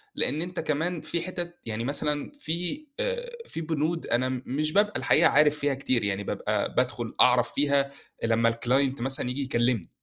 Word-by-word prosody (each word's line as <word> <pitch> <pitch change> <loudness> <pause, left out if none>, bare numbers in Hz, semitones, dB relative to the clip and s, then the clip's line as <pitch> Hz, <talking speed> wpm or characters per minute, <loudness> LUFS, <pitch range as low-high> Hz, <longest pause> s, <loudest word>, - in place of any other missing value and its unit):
لأن 155 - -1
أنت 180 +1 -5
كمان 160 +3 -3
في 170 - -4
حتت 175 -1 -6
يعني 115 0 -5
مثلًا 145 +2 +5
في 180 - -4
آآ - - -4 0.2
في 165 - -7
بنود 160 +1 -3
أنا 125 +2 -1
م 130 -1 -5
مش 155 +4 0
بابقى 210 +1 +2
الحقيقة - - +3
عارف 150 0 +2
فيها 145 -1 -1
كتير 130 -4 -2
يعني 100 0 -3
بابقى - - -4
بادخل - - -3
أعرف 125 -1 +2
فيها 140 -1 0 0.3
لمّا 115 0 +1
الclient 130 +3 -1
مثلًا 135 0 +9
ييجي 125 +3 -4
يكلمني. 120 -7 -2
140 Hz, 175 wpm, -25 LUFS, 125-165 Hz, 0.3 s, مثلًا